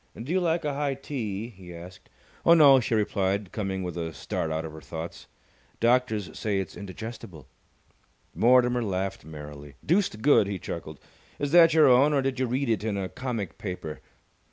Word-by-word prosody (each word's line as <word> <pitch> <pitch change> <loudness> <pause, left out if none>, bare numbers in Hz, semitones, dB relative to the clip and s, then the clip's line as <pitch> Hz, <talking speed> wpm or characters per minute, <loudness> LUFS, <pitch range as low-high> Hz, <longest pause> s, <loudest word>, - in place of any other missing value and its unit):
"Do 125 +7 -5
you 185 - +2
like 165 -2 0
a 145 - -1
high 140 -1 -1
tee?" 115 -6 -5
he 90 -5 -12
asked. 90 +2 -12 0.3
"Oh, 170 - +7
no," 140 -5 +8
she 115 -1 -1
replied, 100 -2 0
coming 95 -3 -3
with 90 -2 -5
a 85 -1 -3
start 80 - -3
out 80 +1 -2
of 80 - -8
her 80 - -10
thoughts. 80 +2 -8 0.5
"Doctors 115 -7 +1
say 105 -2 -1
it's 95 - -4
indigestible." 100 - -8 0.9
Mortimer 125 +1 +4
laughed 95 -2 -3
merrily. 75 -2 -10
"Deuced 170 - +1
good!" 140 -8 +5
he 100 -1 -3
chuckled. 80 -3 -7 0.4
"Is 145 -1 -2
that 165 -1 +7
your 155 - +7
own 135 +4 +5
or 140 -2 +2
did 130 -1 -2
you 130 - +1
read 130 +3 -1
it 110 -2 0
in 110 -2 -1
a 95 -1 -3
comic 115 -9 -5
paper? 90 - -6
105 Hz, 180 wpm, -27 LUFS, 90-130 Hz, 0.9 s, no